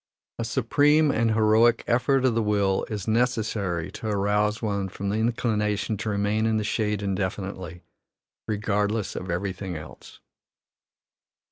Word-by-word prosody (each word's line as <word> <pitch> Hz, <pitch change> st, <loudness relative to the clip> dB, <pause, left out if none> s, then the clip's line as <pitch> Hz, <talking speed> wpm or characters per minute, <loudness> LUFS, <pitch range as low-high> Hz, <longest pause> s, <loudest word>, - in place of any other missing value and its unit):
A -, -, 0 dB
supreme 145 Hz, +6 st, +3 dB
and 115 Hz, -2 st, +1 dB
heroic 110 Hz, +2 st, +4 dB
effort 130 Hz, +2 st, +2 dB
of 125 Hz, -, +3 dB
the 115 Hz, -, +1 dB
will 100 Hz, -2 st, +1 dB
is 105 Hz, -4 st, -5 dB
necessary 110 Hz, -7 st, 0 dB
to 110 Hz, -, -7 dB
arouse 105 Hz, +1 st, +1 dB
one 100 Hz, -3 st, -2 dB
from 100 Hz, +1 st, -4 dB
the 105 Hz, -, 0 dB
inclination 110 Hz, -2 st, 0 dB
to 110 Hz, +2 st, -3 dB
remain 105 Hz, +2 st, +1 dB
in 110 Hz, -1 st, +1 dB
the 105 Hz, -, -1 dB
shade 105 Hz, -1 st, -1 dB
indefinitely, 95 Hz, -2 st, -4 dB, 0.6 s
regardless 105 Hz, 0 st, -1 dB
of 90 Hz, -, -5 dB
everything 95 Hz, +1 st, -3 dB
else. 75 Hz, 0 st, -11 dB
105 Hz, 135 wpm, -25 LUFS, 100-115 Hz, 0.6 s, heroic